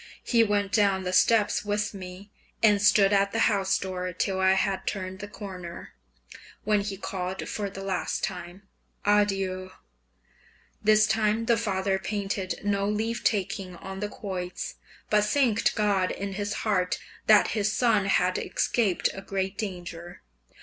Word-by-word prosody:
He 230 Hz, -2 st, +4 dB
went 205 Hz, -2 st, 0 dB
down 200 Hz, -3 st, +2 dB
the 180 Hz, 0 st, -3 dB
steps 215 Hz, +2 st, +3 dB
with 210 Hz, +1 st, -1 dB
me, 190 Hz, +1 st, -9 dB, 0.3 s
and 205 Hz, -2 st, +5 dB
stood 205 Hz, -1 st, +5 dB
at 200 Hz, 0 st, +3 dB
the -, -, +1 dB
house 195 Hz, -2 st, +2 dB
door 185 Hz, -1 st, -4 dB
till 190 Hz, +2 st, -1 dB
I 190 Hz, 0 st, +5 dB
had 190 Hz, 0 st, -1 dB
turned 190 Hz, -1 st, -3 dB
the 205 Hz, -, -6 dB
corner, 185 Hz, -4 st, -8 dB, 0.7 s
when 210 Hz, -1 st, +2 dB
he 200 Hz, -1 st, -4 dB
called 185 Hz, -1 st, -4 dB
for 205 Hz, -2 st, -3 dB
the 195 Hz, 0 st, -8 dB
last 190 Hz, -2 st, -2 dB
time, 180 Hz, +1 st, -5 dB, 0.4 s
"Adieu!" 195 Hz, -3 st, +1 dB, 1.1 s
This 215 Hz, 0 st, +5 dB
time 220 Hz, +1 st, +1 dB
the 235 Hz, 0 st, +4 dB
father 195 Hz, -3 st, 0 dB
painted 195 Hz, -1 st, -3 dB
no 200 Hz, 0 st, 0 dB
leave 225 Hz, +3 st, -2 dB
taking 190 Hz, -3 st, -1 dB
on 190 Hz, +2 st, -8 dB
the 210 Hz, 0 st, -3 dB
quoits, 185 Hz, -4 st, -5 dB, 0.4 s
but 210 Hz, -1 st, +4 dB
thanked 225 Hz, -1 st, +2 dB
God 200 Hz, -4 st, +2 dB
in 200 Hz, 0 st, -4 dB
his 205 Hz, +1 st, -3 dB
heart 185 Hz, -4 st, +1 dB, 0.3 s
that 215 Hz, -1 st, +6 dB
his 210 Hz, -2 st, 0 dB
son 220 Hz, -3 st, +2 dB
had 185 Hz, -1 st, +2 dB
escaped 210 Hz, -7 st, +1 dB
a 195 Hz, -, -7 dB
great 195 Hz, 0 st, -3 dB
danger. 175 Hz, -4 st, -7 dB
200 Hz, 150 wpm, -27 LUFS, 190-210 Hz, 1.1 s, that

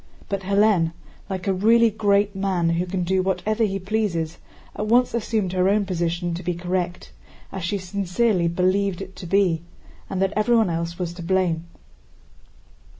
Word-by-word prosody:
But 195 Hz, -1 st, -2 dB
Hélène, 195 Hz, -4 st, +3 dB, 0.4 s
like 185 Hz, -2 st, -4 dB
a 195 Hz, -, +3 dB
really 225 Hz, +4 st, +4 dB
great 205 Hz, -1 st, +2 dB
man 190 Hz, -3 st, 0 dB
who 170 Hz, +2 st, 0 dB
can 180 Hz, 0 st, -2 dB
do 190 Hz, +2 st, +1 dB
whatever 210 Hz, +4 st, 0 dB
he 195 Hz, -2 st, 0 dB
pleases, 185 Hz, -5 st, -2 dB, 0.4 s
at 210 Hz, -, -3 dB
once 245 Hz, +3 st, +3 dB
assumed 215 Hz, -5 st, -1 dB
her 185 Hz, +1 st, +3 dB
own 205 Hz, 0 st, +2 dB
position 175 Hz, -1 st, -1 dB
to 170 Hz, -, -4 dB
be 180 Hz, -1 st, -2 dB
correct, 175 Hz, 0 st, -3 dB, 0.4 s
as 190 Hz, -3 st, -5 dB
she 200 Hz, +4 st, -1 dB
sincerely 190 Hz, 0 st, 0 dB
believed 185 Hz, +2 st, +1 dB
it 190 Hz, 0 st, -12 dB
to 180 Hz, -, -7 dB
be, 180 Hz, -3 st, +2 dB, 0.5 s
and 190 Hz, -, -3 dB
that 195 Hz, +1 st, +1 dB
everyone 220 Hz, -2 st, +3 dB
else 170 Hz, +1 st, -3 dB
was 175 Hz, -2 st, -3 dB
to 175 Hz, -, -9 dB
blame. 170 Hz, -2 st, 0 dB
190 Hz, 165 wpm, -23 LUFS, 175-205 Hz, 0.5 s, really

